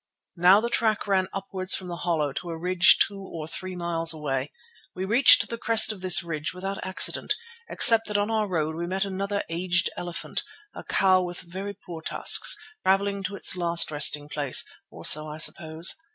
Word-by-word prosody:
Now 180 +4 +5
the 235 +2 -3
track 220 -2 0
ran 190 -2 0
upwards 190 -1 -2
from 185 - -6
the 175 -1 -7
hollow 160 -5 -2
to 175 - -7
a 165 - -6
ridge 180 +2 +4
two 200 -2 -12
or 165 -5 -9
three 185 +3 -7
miles 165 -2 0
away. 140 -2 -4 0.4
We 185 - -5
reached 235 +7 +5
the 230 - -7
crest 225 -1 +4
of 205 -4 -10
this 185 -2 +5
ridge 155 -1 -5
without 195 +2 -6
accident, 185 0 0 0.3
except 225 -1 +4
that 210 -1 -2
on 205 +2 -2
our 215 -1 -1
road 160 -4 -3
we 170 +1 -5
met 190 +2 -2
another 200 +1 -4
aged 175 +1 -1
elephant, 175 0 -5 0.3
a - - -10
cow 185 -1 +2
with 175 -1 -6
very 190 +3 -8
poor 165 -2 -11
tusks, - - +3 0.3
travelling 200 +1 0
to 195 +2 -5
its 190 - +2
last 170 -2 +2
resting 145 0 +3
place, 145 -3 +2 0.2
or - - -12
so 155 0 +4
I 150 - -8
suppose. 160 +1 +2
185 Hz, 190 wpm, -24 LUFS, 165-195 Hz, 0.4 s, Now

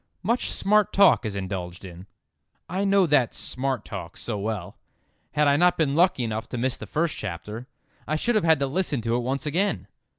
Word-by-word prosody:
Much 235 +6 0
smart 210 +1 +2
talk 190 - +5
is 100 - -5
indulged 95 -2 -5
in." 90 +1 -11 0.6
I 190 +3 -2
know 195 -1 +4
that 145 -7 +2
"smart 130 -3 -1
talk" 85 +2 -7
so 115 - -4
well. 100 -3 -4 0.5
Had 150 -1 +3
I 140 0 +4
not 180 +2 +3
been 150 -4 +1
lucky 170 -5 +3
enough 110 0 -4
to 125 - -4
miss 130 +2 0
that - - -9
first 160 +1 -1
chapter 105 +5 -6 0.4
I 155 - 0
should 235 +10 0
have 215 - +2
had 160 -1 +5
to - - +3
listen 145 -2 -1
to 115 +1 0
it - - +1
once 130 +4 -2
again. 150 - 0
135 Hz, 200 wpm, -25 LUFS, 105-170 Hz, 0.6 s, talk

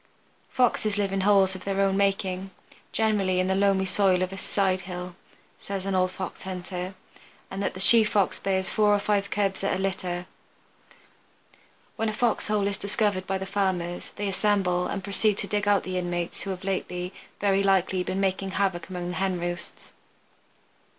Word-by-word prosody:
Foxes 220 -4 +1
live 200 -1 0
in 195 - 0
holes 195 -1 +4
of 185 -1 -8
their 195 0 -2
own 195 -1 +3
making, 195 -1 0 0.4
generally 205 -4 +1
in 185 - +2
the 190 - +2
loamy 195 0 +2
soil 190 -1 +2
of 185 +1 -3
a - - -6
side 190 -2 0
hill, 180 -1 -7 0.4
says 195 -1 -5
an 195 - -1
old 185 0 +2
Fox 185 -1 -6
hunter, 185 0 -5 0.6
and 195 +1 -4
the 185 - -2
she 225 +4 +9
Fox 210 -2 +1
bears 190 -1 0
four 210 -1 +4
or - - +1
five 200 -1 0
cubs 195 -2 -1
at 195 - +1
a - - -1
litter. 180 -2 -2 1.7
When 225 0 0
a - - -3
fox 230 0 0
hole 210 -1 +1
is 200 -1 -1
discovered 200 -2 -1
by 195 - 0
the 190 - -5
Farmers 190 -3 -2
they 205 - -3
assemble 190 -3 +1
and 195 - -4
proceed 200 +1 +1
to - - -4
dig 205 -1 -1
out 205 -1 +4
the 185 0 -2
inmates 175 -1 -3
who 200 - -4
have 185 -1 -5
lately, 180 -1 -3 0.3
very 195 -1 +2
likely, 190 -1 +2
been 190 +1 -2
making 190 0 -1
havoc 190 -3 -1
among 180 -1 -4
the 180 - -4
hen 190 -2 0
roosts. 175 0 -6
195 Hz, 185 wpm, -26 LUFS, 185-200 Hz, 1.7 s, she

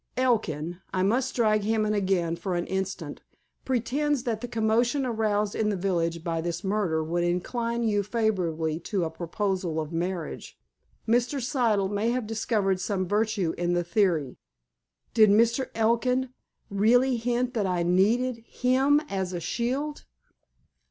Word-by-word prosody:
"Elkin—I 185 - -1
must 245 +6 +1
drag 215 -3 +3
him 215 +1 +1
in 215 - 0
again 190 -5 +1
for 185 +1 -3
an 175 - -1
instant—pretends 240 - -3
that 225 -3 -2
the 245 - -4
commotion 235 +5 +1
aroused 215 -3 0
in 215 -1 0
the 205 - 0
village 170 -3 -1
by 165 -2 -1
this 170 +1 -3
murder 190 -6 0
would 170 +2 -1
incline 230 +7 -1
you 210 -2 +2
favorably 180 -8 -1
to 190 +1 -2
a 160 - -2
proposal 175 0 -2
of 155 +1 -5
marriage. 170 -1 -4 0.5
Mr. 245 +5 +2
Siddle 235 -6 +1
may 205 +3 0
have 245 -1 -1
discovered 210 -3 0
some 185 -1 -1
virtue 205 -4 0
in 175 0 +1
the 175 0 +1
theory." 170 - +1 0.8
"Did 220 -2 +6
Mr. 235 +5 +3
Elkin 240 +3 +1 0.4
really 245 +6 +3
hint 245 +2 -1
that 210 -5 0
I 180 -2 0
needed 220 +8 +2
him 265 +4 +2
as 190 -4 -3
a 175 - -2
shield?" 260 - -2
210 Hz, 145 wpm, -27 LUFS, 175-235 Hz, 0.8 s, Did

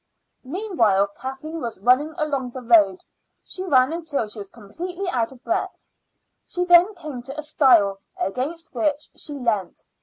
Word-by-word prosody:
Meanwhile 255 - +1
Kathleen 285 +5 -6
was 235 -2 -4
running 255 +9 +3
along 280 -5 -1
the 255 +1 -8
road. 210 -5 +4 0.4
She 370 - -5
ran 270 -5 +3
until 315 -8 -2
she 210 +1 -6
was 200 -1 -7
completely 355 - -6
out 240 -8 0
of 260 -1 -16
breath. 375 +2 -3 0.6
She 360 - -1
then 355 +4 +6
came 305 -8 -7
to 275 +4 -8
a 300 - -3
stile, 235 -10 +4 0.2
against 300 +10 -3
which 300 -2 -1
she 295 - -4
leant. 225 -9 -2
275 Hz, 155 wpm, -23 LUFS, 235-330 Hz, 0.6 s, then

